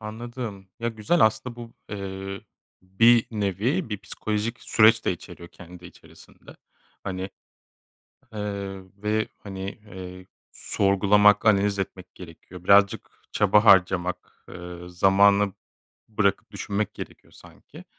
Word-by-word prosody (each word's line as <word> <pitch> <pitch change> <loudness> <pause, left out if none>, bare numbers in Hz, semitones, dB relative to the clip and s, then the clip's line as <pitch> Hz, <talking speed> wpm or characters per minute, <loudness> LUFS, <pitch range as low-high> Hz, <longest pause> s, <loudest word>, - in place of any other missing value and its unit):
Anladım. 110 -2 -7
Ya 115 - -1
güzel 115 +9 0
aslında 110 +3 +1
bu, 120 -1 -10 0.2
eee, 95 -1 -6 0.4
bir 115 +5 +4
nevi 110 - -1
bir 105 -2 -4
psikolojik 105 +4 -4
süreç 110 0 +4
de - - +1
içeriyor 85 0 -11
kendi 90 0 -13
içerisinde. - - -17 0.5
Hani, 95 -1 -4 1.1
eee, 100 -2 -5 0.2
ve, 110 +1 0 0.2
hani, 95 -1 -5
eee, 95 -3 -11 0.3
sorgulamak, 105 +1 +3
analiz 100 -1 +3
etmek 95 -1 -6
gerekiyor. 90 0 -12
Birazcık 100 +3 +4 0.2
çaba 105 +1 +3
harcamak, 90 -3 +2
eee, 90 0 -9
zamana 100 +2 +3 0.6
bırakıp 100 -2 0
düşünmek 100 0 -3
gerekiyor - - -10
sanki. - - -16
100 Hz, 110 wpm, -25 LUFS, 95-110 Hz, 1.1 s, bir